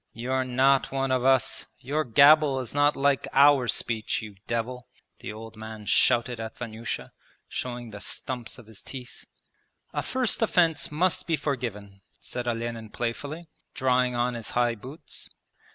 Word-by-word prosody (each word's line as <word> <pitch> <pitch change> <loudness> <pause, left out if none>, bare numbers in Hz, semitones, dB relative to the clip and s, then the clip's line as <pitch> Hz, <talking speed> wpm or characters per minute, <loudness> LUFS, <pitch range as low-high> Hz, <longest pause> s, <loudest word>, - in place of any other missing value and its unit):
'You're 130 +3 -1
not 130 +2 +3
one 135 0 0
of 130 -1 +2
us 130 -2 +2
your 145 +5 -1
gabble 140 +2 +6
is 125 -3 -5
not 145 +1 +3
like 140 -1 +2
our 140 -2 +6
speech, 110 -2 0
you 110 -2 -8
devil!' 120 +2 -3 0.3
the - - -6
old 110 +1 -9
man 110 -1 -8
shouted 120 +3 +3
at 110 0 -6
Vanyusha, 110 - -5 0.4
showing 120 -2 -5
the 100 -1 -9
stumps 120 -4 -5
of 120 - -13
his 110 -2 -13
teeth. 130 0 -10 0.7
'A - - 0
first 255 -3 -1
offence 170 -8 +2
must 175 +4 +1
be 165 - +3
forgiven,' 115 -9 -4 0.2
said 125 -1 -5
Olenin 115 -1 -3
playfully, 140 +9 -4 0.3
drawing 125 -1 +2
on 120 +1 +1
his 115 -2 -5
high 120 -1 +3
boots. 130 +8 -9
125 Hz, 150 wpm, -27 LUFS, 115-140 Hz, 0.7 s, gabble